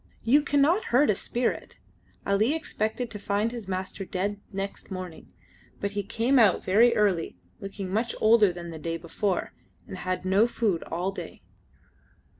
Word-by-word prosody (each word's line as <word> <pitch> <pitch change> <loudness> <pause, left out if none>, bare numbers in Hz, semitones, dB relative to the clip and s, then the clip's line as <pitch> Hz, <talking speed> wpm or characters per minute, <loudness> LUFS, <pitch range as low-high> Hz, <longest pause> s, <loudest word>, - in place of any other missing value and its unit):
You 275 +6 +5
cannot 290 +7 +2
hurt 255 +1 +4
a - - +2
spirit. 240 +5 -3 0.5
Ali 215 +9 +2
expected 235 -6 -3
to 210 - -5
find 205 +3 0
his 235 -5 -7
master 190 +1 -4
dead 195 +2 -3
next 195 0 -5
morning, 185 -4 -7 0.5
but 200 - -2
he 205 0 -2
came 230 +6 +1
out 210 -6 +4
very 225 +6 +5
early, 195 -6 +1 0.2
looking 195 -1 -6
much 230 +3 0
older 215 -3 +5
than 175 -1 -8
the 160 - -8
day 165 +1 -3
before, 175 +3 -2 0.3
and 190 - -8
had 185 0 -3
no 195 +5 +4
food 215 -8 0
all 180 +3 -1
day. 195 - -9
205 Hz, 160 wpm, -27 LUFS, 185-230 Hz, 0.5 s, You